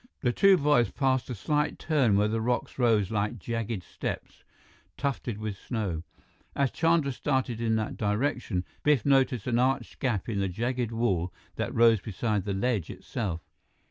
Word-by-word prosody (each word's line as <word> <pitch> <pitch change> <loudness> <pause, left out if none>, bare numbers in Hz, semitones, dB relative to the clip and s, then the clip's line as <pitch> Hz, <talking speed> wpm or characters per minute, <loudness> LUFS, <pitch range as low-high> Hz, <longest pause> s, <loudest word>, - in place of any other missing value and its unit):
The 125 -3 +1
two 195 +5 +6
boys 145 -6 +3
passed 130 -2 0
a 125 - -3
slight 150 +8 0
turn 135 -10 +2
where 105 +1 +3
the 110 +1 -1
rocks 120 +2 -1
rose 110 -5 +3
like 105 +2 -1
jagged 115 -2 -3
steps, - - -6 0.5
tufted 130 -6 -2
with 105 -1 -4
snow. 100 -6 -3 0.5
As 140 -2 +1
Chandra 165 -4 +2
started 130 -3 -1
in 115 -1 +1
that 110 -1 -2
direction, 105 -3 -1 0.2
Biff 145 -6 +3
noticed 135 -5 +3
an 120 -2 +1
arched 130 +2 0
gap 115 -7 -1
in 110 -4 -1
the 100 -1 0
jagged 120 +4 -2
wall 95 -7 0 0.2
that - - -2
rose 115 -3 +5
beside 105 -1 -2
the 100 - -1
ledge 105 -4 0
itself. 90 -7 -4
115 Hz, 165 wpm, -28 LUFS, 105-130 Hz, 0.5 s, two